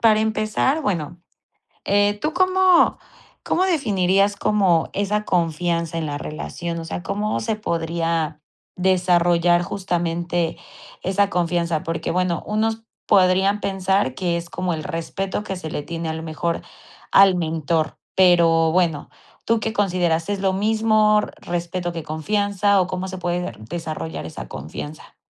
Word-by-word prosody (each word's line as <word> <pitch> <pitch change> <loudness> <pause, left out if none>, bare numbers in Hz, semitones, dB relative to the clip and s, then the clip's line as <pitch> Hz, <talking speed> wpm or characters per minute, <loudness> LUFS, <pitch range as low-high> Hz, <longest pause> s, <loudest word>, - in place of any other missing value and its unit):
para 215 -2 +5
empezar, 220 +7 +1
bueno, 170 - -2 0.7
eh, 205 +1 +2
¿tú 305 +1 -1
cómo 370 0 +4 0.5
cómo 370 +2 +2
definirías 200 - +2
como 190 -7 +2
esa 210 +1 -1
confianza 170 -1 0
en 165 - -2
la 145 -1 -3
relación? 170 +3 -5
O 165 - -7
sea, 175 - -5
¿cómo 205 +3 -1
se 220 -1 -1
podría 165 -4 -1 0.4
desarrollar 175 -2 +3
justamente 175 -2 -2 0.4
esa 195 +2 +1
confianza? 170 -2 0
Porque 165 -2 -3
bueno, 180 -2 0
unos 220 +1 -1 0.2
podrían 190 +2 +4
pensar 190 -8 0
que 175 -2 0
es 170 0 -7
como 180 -1 -2
el 155 +2 -5
respeto 190 +3 -3
que 195 -3 -4
se 160 -3 -6
le 145 - -4
tiene 165 0 -5
a 160 - -2
lo 160 0 -6
mejor 165 +1 -2 0.5
al 195 -2 +7
mentor. 160 -1 -1 0.2
Pero, 170 -3 +5
bueno, 170 -4 +1 0.3
¿tú 230 0 +1
qué 220 +1 -3
consideras, 175 -5 +1
es 205 - -1
lo 190 -1 +1
mismo 215 +1 +3 0.2
respeto 175 0 -3
que 165 -2 -6
confianza, 200 +5 +1
o 180 - +1
cómo 185 0 -4
se 185 - -6
puede 175 -1 -1
de 120 - -4 0.2
desarrollar 155 - -5
esa 80 - -7
confianza? 145 - -8
180 Hz, 145 wpm, -22 LUFS, 165-205 Hz, 0.7 s, al